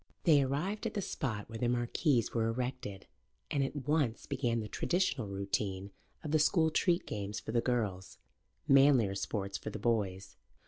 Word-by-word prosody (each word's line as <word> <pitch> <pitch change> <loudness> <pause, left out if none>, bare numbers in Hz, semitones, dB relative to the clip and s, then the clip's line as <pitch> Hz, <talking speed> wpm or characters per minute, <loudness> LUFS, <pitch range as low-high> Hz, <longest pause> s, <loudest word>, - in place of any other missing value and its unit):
They 150 -5 +6
arrived 150 +11 -1
at - - -6
the 205 - 0
spot 110 -13 -3
where 115 0 -7
the 120 - +1
marquees 120 +1 +1
were 115 -1 +1
erected, 120 -4 -4 0.5
and 140 - +1
at 135 0 -4
once 145 -7 +1
began 125 -4 -1
the 110 - -4
traditional 170 - 0
routine 100 0 -2 0.3
of 150 - -4
the 155 - +4
school 160 +1 +3
treat 175 +2 +2
games 105 0 -4
for - - -6
the 120 0 +2
girls, 105 -7 -2 0.5
manlier 135 -7 +5
sports 100 0 -3
for - - -5
the - - -6
boys. 100 -5 -1
120 Hz, 170 wpm, -32 LUFS, 105-145 Hz, 0.5 s, They